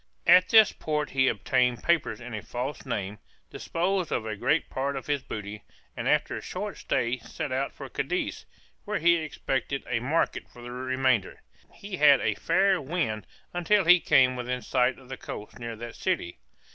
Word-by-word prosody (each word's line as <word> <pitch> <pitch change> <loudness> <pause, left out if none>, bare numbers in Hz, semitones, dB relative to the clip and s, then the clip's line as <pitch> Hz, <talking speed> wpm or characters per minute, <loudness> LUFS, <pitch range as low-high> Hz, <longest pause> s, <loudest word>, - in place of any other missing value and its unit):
At 185 0 +6
this 220 -2 +7
port 150 -1 -2
he 130 -1 +3
obtained 120 +3 +1
papers 170 -1 +1
in 120 -1 -8
a 105 - -4
false 130 +6 -5
name, 105 -3 -3 0.3
disposed 180 +1 -1
of 110 - -1
a 110 -1 -3
great 150 +10 +1
part 140 +1 -2
of 135 - -5
his 145 -2 0
booty, 105 -2 -7 0.3
and - - -2
after - - +2
a - - -5
short - - -5
stay 120 +2 -1
set 130 - -6
out 135 +2 -1
for - - -9
Cadiz, - - -3 0.4
where - - -2
he 170 +1 +4
expected 140 -4 -3
a 120 - 0
market 145 +8 -1
for 120 - -13
the 120 - -7
remainder. 130 -4 0 0.3
He 200 -2 -7
had 145 -3 +7
a - - +1
fair 195 -3 +2
wind 130 - -2 0.3
until 180 +3 +2
he 180 +2 +7
came 130 -5 +4
within 125 -1 -3
sight 125 +2 +1
of 130 - -16
the 135 - -7
coast 105 - -8
near 115 -1 -5
that 115 +1 -8
city. 170 - -2
130 Hz, 185 wpm, -27 LUFS, 120-160 Hz, 0.4 s, this